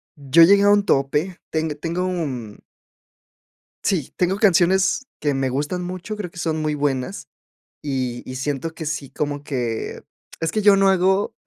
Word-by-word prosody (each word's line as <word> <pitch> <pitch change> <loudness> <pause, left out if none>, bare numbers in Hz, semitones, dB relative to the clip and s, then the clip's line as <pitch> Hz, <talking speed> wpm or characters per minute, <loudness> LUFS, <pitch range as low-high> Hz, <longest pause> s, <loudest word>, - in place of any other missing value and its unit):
yo 145 +3 +5
llegué 200 +3 +6
a 205 - +5
un 205 0 +4
tope, 150 +7 +1
teng 160 0 -1
tengo, 175 +3 -2
mm 130 - -4 1.3
Sí, 180 -9 0
tengo 180 +1 +1
canciones 190 +5 +3
que 145 -2 0
me 135 -1 0
gustan 150 +7 -2
mucho, 185 +4 -5
creo 200 -5 -5
que 175 - -13
son 160 -2 -1
muy 155 -1 -1
buenas, 140 +3 -2 0.5
y 130 -4 -3
y 130 - -5
siento 145 +4 -3
que 160 -1 -6
sí, 150 -3 -4
como 145 -1 -3
que 120 -6 -3 0.4
es 165 - 0
que 215 +4 -1
yo 200 -1 +6
no 195 0 +4
hago 190 +1 +2
160 Hz, 165 wpm, -22 LUFS, 140-185 Hz, 1.3 s, llegué